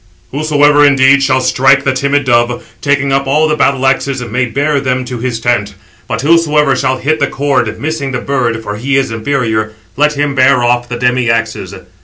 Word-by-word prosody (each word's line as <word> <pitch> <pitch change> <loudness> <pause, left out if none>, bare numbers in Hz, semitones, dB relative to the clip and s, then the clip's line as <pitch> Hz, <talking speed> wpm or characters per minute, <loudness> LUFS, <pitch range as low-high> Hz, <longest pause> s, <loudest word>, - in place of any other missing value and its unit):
"Whosoever 145 0 +2
indeed 140 -1 +4
shall 130 -1 +1
strike 135 +2 +2
the 135 - 0
timid 140 +2 0
dove, 120 0 0 0.2
taking 140 -1 0
up 135 0 0
all 150 +3 +2
the 155 - 0
battle 135 -3 0
axes, 135 0 0
may 120 +2 -2
bear 140 +4 -1
[them] 130 -1 -2
to 125 -1 -6
his 120 -1 -3
tent; 110 -4 -1 0.3
but - - -3
whosoever 150 -2 +2
shall 130 -1 -1
hit 155 +5 -1
the - - +1
cord, 140 0 -1
missing 145 -2 -3
the 125 - -2
bird 120 -4 -2
(for 105 -1 -5
he 140 +5 -1
is 135 -4 -1
inferior), 110 -3 -2 0.2
let 150 +2 +1
him 145 -1 -1
bear 130 -1 +3
off 120 0 0
the 120 - -4
demi 125 0 0
axes." 115 -1 -2
135 Hz, 195 wpm, -12 LUFS, 120-140 Hz, 0.3 s, indeed